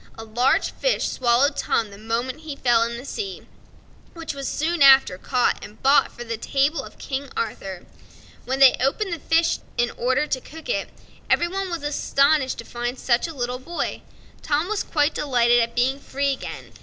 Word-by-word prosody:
A 225 Hz, -, -7 dB
large 240 Hz, +4 st, +1 dB
fish -, -, 0 dB
swallowed 250 Hz, +3 st, +2 dB
Tom 220 Hz, -3 st, 0 dB
the 200 Hz, -, -11 dB
moment 235 Hz, +5 st, -3 dB
he 310 Hz, -3 st, -7 dB
fell 240 Hz, -4 st, +3 dB
into 235 Hz, 0 st, -1 dB
the 245 Hz, -, -9 dB
sea, 390 Hz, +6 st, -5 dB, 0.7 s
which 330 Hz, -2 st, -5 dB
was 275 Hz, -1 st, -5 dB
soon 330 Hz, +2 st, -1 dB
after 265 Hz, -9 st, +6 dB
caught 250 Hz, +3 st, 0 dB
and 210 Hz, +2 st, -11 dB
bought 275 Hz, +2 st, +4 dB
for 240 Hz, -, -8 dB
the 230 Hz, -1 st, -4 dB
table 280 Hz, +7 st, 0 dB
of -, -, -12 dB
King 275 Hz, 0 st, -5 dB
Arthur. 190 Hz, -5 st, -4 dB, 0.6 s
When 265 Hz, +2 st, -1 dB
they 270 Hz, -1 st, +7 dB
opened 340 Hz, -, 0 dB
the 335 Hz, -, -4 dB
fish 325 Hz, +2 st, +2 dB, 0.2 s
in 240 Hz, 0 st, +1 dB
order 260 Hz, +4 st, 0 dB
to 260 Hz, -3 st, -2 dB
cook 320 Hz, -, -11 dB
it, -, -, -1 dB, 0.4 s
every 345 Hz, -, +3 dB
one 385 Hz, +1 st, -3 dB
was 340 Hz, -4 st, -4 dB
astonished 285 Hz, -1 st, +2 dB
at -, -, -15 dB
finding 240 Hz, +2 st, -4 dB
such 245 Hz, +4 st, +1 dB
a 325 Hz, -, -8 dB
little 250 Hz, -1 st, -3 dB
boy, 340 Hz, +7 st, -4 dB, 0.3 s
and -, -, -28 dB
Tom 305 Hz, +5 st, 0 dB
was 430 Hz, -1 st, 0 dB
quite 295 Hz, -1 st, +1 dB
delighted 240 Hz, -4 st, +3 dB
at 235 Hz, 0 st, -1 dB
being 260 Hz, +3 st, +1 dB
free 280 Hz, 0 st, -1 dB
again. 265 Hz, -, -8 dB
270 Hz, 195 wpm, -23 LUFS, 240-305 Hz, 0.7 s, they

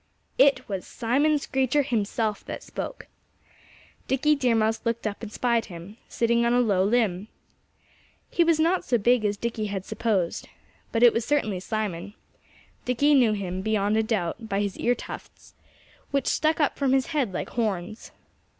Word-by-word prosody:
It 275 Hz, +1 st, +4 dB
was 195 Hz, -3 st, -4 dB
Simon 285 Hz, +6 st, +1 dB
Screecher 265 Hz, 0 st, +1 dB
himself 220 Hz, -3 st, -1 dB
that -, -, -6 dB
spoke. -, -, -6 dB, 1.0 s
Dickie 275 Hz, +3 st, +2 dB
Deer 255 Hz, -5 st, +2 dB
Mouse 220 Hz, 0 st, +1 dB
looked 230 Hz, -1 st, -2 dB
up 205 Hz, -1 st, -3 dB
and 225 Hz, -2 st, -7 dB
spied 235 Hz, 0 st, +1 dB
him, 180 Hz, +3 st, -10 dB
sitting 235 Hz, 0 st, +1 dB
on 235 Hz, 0 st, +2 dB
a 245 Hz, -, +4 dB
low 200 Hz, -6 st, +2 dB
limb. 205 Hz, -3 st, +1 dB, 1.0 s
He 340 Hz, -, +3 dB
was 330 Hz, -1 st, +2 dB
not 340 Hz, +4 st, +2 dB
so 245 Hz, -, +1 dB
big 240 Hz, +2 st, +3 dB
as 205 Hz, -1 st, 0 dB
Dickie 225 Hz, -1 st, -3 dB
had 195 Hz, -2 st, -4 dB
supposed. 210 Hz, -6 st, -1 dB, 0.4 s
But 230 Hz, +1 st, +1 dB
it 240 Hz, -, +8 dB
was 230 Hz, -, 0 dB
certainly 220 Hz, -9 st, 0 dB
Simon. 205 Hz, -1 st, -4 dB, 0.7 s
Dickie 285 Hz, +4 st, +2 dB
knew 245 Hz, -6 st, +5 dB
him, 190 Hz, -2 st, -3 dB
beyond 210 Hz, 0 st, +1 dB
a 220 Hz, -, +3 dB
doubt, 220 Hz, 0 st, -2 dB
by 195 Hz, -, 0 dB
his 200 Hz, -2 st, -2 dB
ear 245 Hz, +1 st, +2 dB
tufts, -, -, -10 dB, 0.6 s
which 275 Hz, -2 st, 0 dB
stuck 315 Hz, +1 st, +1 dB
up 295 Hz, -, +1 dB
from 270 Hz, -2 st, +2 dB
his 265 Hz, -1 st, +3 dB
head 270 Hz, -9 st, 0 dB
like 185 Hz, -, -4 dB
horns. 215 Hz, -2 st, -3 dB
230 Hz, 170 wpm, -26 LUFS, 205-255 Hz, 1.0 s, it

